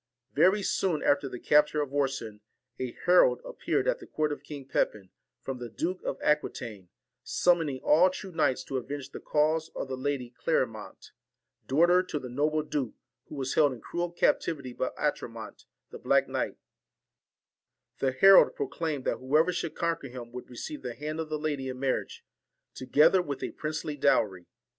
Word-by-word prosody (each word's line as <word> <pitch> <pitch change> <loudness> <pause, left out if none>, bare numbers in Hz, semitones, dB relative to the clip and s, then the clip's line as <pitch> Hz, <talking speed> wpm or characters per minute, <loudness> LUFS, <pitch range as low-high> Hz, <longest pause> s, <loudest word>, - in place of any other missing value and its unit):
Very 190 +7 +4
soon 180 -5 0
after 140 -1 +2
the 125 - -7
capture 150 +1 +3
of 145 -2 -2
Orson, 130 -7 -2 0.4
a 130 -2 -3
herald 180 0 +5
appeared - - -1
at - - +1
the - - -12
court 155 -1 -1
of 145 - -5
King 140 -3 -9
Pepin, 100 -7 -1 0.3
from 135 -2 -5
the 120 -1 -6
Duke 180 +10 -3
of - - -3
Aquitaine, 115 - -1 0.3
summoning 165 -7 +1
all 170 +5 +5
true 190 +1 -7
knights 145 -6 +1
to 135 - -3
avenge 140 +2 -6
the - - -7
cause 155 +2 +1
of - - -4
the 130 - -2
Lady 130 -2 -3
Clerimont, 115 -9 -2 0.6
daughter 175 +6 +4
to 185 -4 -4
the 130 -3 -6
noble 150 +4 0
duke, 145 -7 -3 0.3
who - - -10
was 135 -1 -2
held 145 -3 +4
in 125 - -10
cruel 175 +6 -3
captivity 145 -6 0
by 130 - -1
Atramont, 115 -7 -4 0.3
the - - -9
black - - +2
knight: - - -2 1.4
the 135 - +1
herald 195 - +7
pro 425 -3 -2
claimed 160 - -3
that - - 0
whoever 155 +7 +2
should 170 -2 -3
conquer 165 -4 -1
him 120 -1 -9
would 125 +1 -8
receive 125 +5 -7
the 120 -2 -5
hand 155 +2 -5
of 160 -1 -3
the 155 - -1
lady 145 -3 -2
in 130 0 -6
marriage, 135 -1 -2 0.5
together 150 +8 +4
with 140 -6 -5
a - - -3
princely 155 -1 -4
dowry. 100 -10 +1
145 Hz, 175 wpm, -29 LUFS, 130-160 Hz, 1.4 s, herald